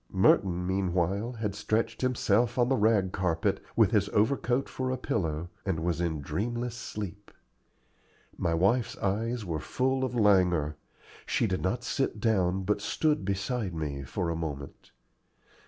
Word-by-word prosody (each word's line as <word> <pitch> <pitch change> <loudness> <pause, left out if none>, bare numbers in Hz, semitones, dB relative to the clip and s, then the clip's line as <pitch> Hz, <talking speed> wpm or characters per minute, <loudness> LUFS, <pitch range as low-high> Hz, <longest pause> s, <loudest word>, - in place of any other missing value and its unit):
Merton 90 -2 +3
meanwhile 95 +4 0
had 110 -4 -3
stretched 110 +2 -1
himself 120 -2 +2
on 120 0 +3
the 135 - +3
rag 105 -5 +3
carpet, 90 -4 0
with - - +4
his - - +2
overcoat 120 +3 +1
for 130 0 -3
a 130 - -1
pillow, 85 -8 -2
and 90 -5 -1
was 85 0 0
in 80 -4 -1
dreamless 120 - -2
sleep. 105 -4 -6 1.1
My 85 -1 0
wife's 105 +8 +2
eyes 110 +3 -1
were 80 -3 -2
full 130 - 0
of 125 -2 -2
languor. 90 -8 +3 0.5
She - - +1
did 95 -3 -1
not 120 +7 -1
sit 130 -3 -1
down, 95 -4 +1
but 105 +1 0
stood 150 +4 +1
beside 100 0 -2
me 75 -3 -3
for 85 +6 -2
a - - -2
moment. 75 -4 -6
100 Hz, 150 wpm, -29 LUFS, 90-120 Hz, 1.1 s, with